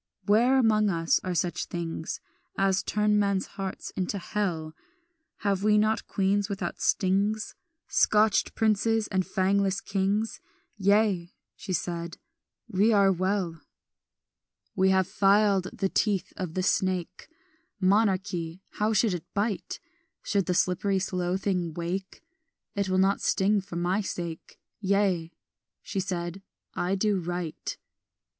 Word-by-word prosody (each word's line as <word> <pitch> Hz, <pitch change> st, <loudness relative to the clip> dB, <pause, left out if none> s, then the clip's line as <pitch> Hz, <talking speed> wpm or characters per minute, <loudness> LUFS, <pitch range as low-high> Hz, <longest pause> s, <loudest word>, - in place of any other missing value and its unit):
"Where 235 Hz, +6 st, +4 dB
among 215 Hz, -4 st, +3 dB
us 165 Hz, -3 st, +2 dB
are 185 Hz, -1 st, -2 dB
such 175 Hz, 0 st, -1 dB
things 165 Hz, -2 st, -4 dB, 0.4 s
As 195 Hz, -1 st, +2 dB
turn 210 Hz, 0 st, +1 dB
men's 200 Hz, -2 st, +1 dB
hearts 195 Hz, -1 st, -6 dB
into 190 Hz, +2 st, -2 dB
hell? 175 Hz, -6 st, -2 dB, 0.7 s
Have 200 Hz, -2 st, 0 dB
we 210 Hz, +1 st, +4 dB
not 215 Hz, +1 st, +1 dB
queens 200 Hz, +1 st, +1 dB
without 200 Hz, -1 st, -4 dB
stings, 200 Hz, +3 st, +1 dB, 0.3 s
Scotched 215 Hz, -1 st, +3 dB
princes, 220 Hz, 0 st, +2 dB
and 190 Hz, -1 st, +1 dB
fangless 195 Hz, +1 st, +1 dB
kings? 200 Hz, +3 st, -1 dB, 0.3 s
Yea," 200 Hz, -3 st, +2 dB, 0.2 s
she -, -, -7 dB
said, 170 Hz, -1 st, -3 dB, 0.5 s
"we 205 Hz, +4 st, +3 dB
are 200 Hz, -2 st, +5 dB
well. 185 Hz, -3 st, -1 dB, 1.1 s
"We 190 Hz, 0 st, +3 dB
have 190 Hz, -1 st, +3 dB
filed 200 Hz, -1 st, +3 dB
the 195 Hz, -, -1 dB
teeth 200 Hz, -2 st, 0 dB
of 180 Hz, -4 st, -5 dB
the 185 Hz, -, 0 dB
snake 185 Hz, -2 st, -1 dB, 0.5 s
Monarchy, 190 Hz, -3 st, +1 dB, 0.2 s
how 215 Hz, +1 st, +2 dB
should 215 Hz, -1 st, +3 dB
it 175 Hz, -3 st, -6 dB
bite? 205 Hz, 0 st, -2 dB, 0.4 s
Should 200 Hz, -3 st, 0 dB
the 180 Hz, -, +1 dB
slippery 190 Hz, +3 st, +1 dB
slow 185 Hz, -2 st, -1 dB
thing 180 Hz, -5 st, -1 dB
wake, 180 Hz, +3 st, -4 dB, 0.5 s
It 200 Hz, -1 st, -1 dB
will 185 Hz, -, +1 dB
not 195 Hz, +1 st, +3 dB
sting 200 Hz, +1 st, +2 dB
for 190 Hz, -2 st, -10 dB
my 180 Hz, +4 st, +1 dB
sake; 170 Hz, -4 st, -6 dB, 0.2 s
Yea," 195 Hz, -4 st, +1 dB, 0.5 s
she 195 Hz, -, -3 dB
said, 180 Hz, -1 st, -3 dB, 0.3 s
"I 180 Hz, +2 st, 0 dB
do 200 Hz, 0 st, +1 dB
right." 175 Hz, -2 st, -4 dB
195 Hz, 130 wpm, -27 LUFS, 180-205 Hz, 1.1 s, are